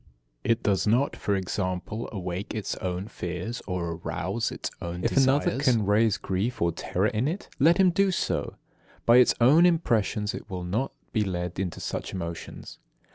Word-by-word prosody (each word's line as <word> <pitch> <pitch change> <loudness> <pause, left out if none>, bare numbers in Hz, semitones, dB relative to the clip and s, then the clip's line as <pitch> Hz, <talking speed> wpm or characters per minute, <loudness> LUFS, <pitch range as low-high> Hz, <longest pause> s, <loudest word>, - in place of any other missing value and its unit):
It 115 +1 +1
does 100 0 +1
not, 125 +6 +2
for 100 - -1
example, 95 +3 -3
awake 95 0 -4
its 105 -3 -3
own 90 +2 -3
fears 90 +4 -5
or 90 -3 -2
arouse 85 +1 -2
its - - -5
own 85 +1 -4
desires. - - +1
If 135 - +4 0.3
another 130 - -3
can 120 -6 +3
raise 105 +1 +3
grief 100 +7 -2
or 85 0 +2
terror 90 +3 -1
in 110 +3 +1
it, 175 +6 -4
let 165 +6 +5
him 190 -2 +5
do 195 +3 +3
so. 185 - -1 0.5
By 120 +1 +7
its 125 - +6
own 140 +8 +6
impressions 110 - +1
it - - -8
will 90 -2 -4
not 105 +10 -1 0.2
be 110 -2 +2
led 90 -2 -3
into 90 -4 -3
such - - -4
emotions. 85 -2 -7
105 Hz, 180 wpm, -27 LUFS, 90-120 Hz, 0.5 s, By